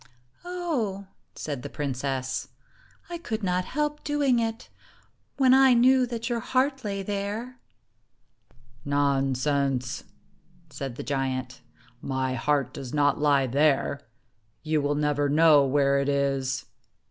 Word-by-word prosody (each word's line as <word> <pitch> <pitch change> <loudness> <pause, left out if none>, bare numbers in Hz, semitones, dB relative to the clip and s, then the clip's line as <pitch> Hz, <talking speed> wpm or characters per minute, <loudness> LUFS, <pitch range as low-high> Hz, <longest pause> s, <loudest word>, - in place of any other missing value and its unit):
"Oh," 305 - -3 0.3
said 145 -4 -5
the - - -7
princess, 130 -2 -3 0.6
"I 345 -1 -6
could 225 -9 -4
not 180 -1 0
help 295 +4 -2
doing 285 -4 +2
it, 225 0 -3 0.7
when 260 -2 +5
I 265 -1 +6
knew 255 +1 +5
that 235 -1 -4
your 240 -2 -1
heart 265 +3 0
lay 200 -2 -3
there." 205 +6 -4 0.6
" 125 0 -32 0.2
Nonsense! 135 -2 0 0.3
" 165 - -33
said 135 -3 -5
the - - -6
giant. 130 -2 -3 0.2
" 120 +1 -30 0.2
My 130 -1 0
heart 140 +1 0
does 135 -1 -6
not 145 -1 +2
lie 140 -2 +3
there. 140 +1 +2 0.6
You 155 -1 +1
will 145 +1 0
never 145 -1 +1
know 150 -1 +6
where 140 0 +2
it 140 0 0
is." 135 -2 0
145 Hz, 135 wpm, -26 LUFS, -, 0.7 s, I